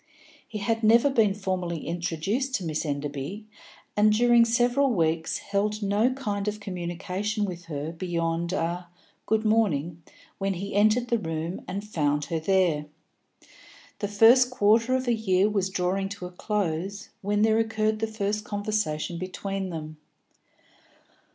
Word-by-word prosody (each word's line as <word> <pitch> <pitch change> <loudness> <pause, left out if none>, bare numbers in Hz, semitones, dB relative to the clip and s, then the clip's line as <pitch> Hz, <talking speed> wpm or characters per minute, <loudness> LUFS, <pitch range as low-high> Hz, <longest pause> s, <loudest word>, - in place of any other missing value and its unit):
He 215 - -6
had 225 +2 -1
never 235 +5 +5
been 215 -6 +3
formally 185 -5 -3
introduced 175 - -2
to 195 - -2
Miss 155 0 -2
Enderby, 145 +7 -4 0.5
and 210 +1 +5
during 240 +1 +5
several 245 +4 +2
weeks 165 -6 0
held 210 +1 -1
no 205 +5 +2
kind 210 -6 -3
of 210 0 -2
communication 190 +3 -3
with 180 -2 -6
her 155 -1 -4
beyond 170 -1 -2
a 175 -1 -2 0.4
"good 220 0 +1
morning" 175 -7 +1 0.4
when 195 -1 0
he 195 +3 -5
entered 215 +4 +3
the 235 - +2
room 165 -1 -4
and 195 +2 -4
found 150 -6 0
her 165 - +1
there. 165 -4 +1 1.1
The 205 - -1
first 230 +5 +6
quarter 230 0 +3
of 260 0 -2
a 240 - +3
year 200 -3 +2
was 200 -3 0
drawing 190 +1 -1
to 180 - -7
a 180 - -7
close 195 +1 -3
when 205 +1 +1
there 220 0 +4
occurred 220 -1 0
the 225 - 0
first 210 -1 -2
conversation 205 -6 -2
between 190 +1 -4
them. 155 -2 -6
200 Hz, 145 wpm, -26 LUFS, 170-215 Hz, 1.1 s, first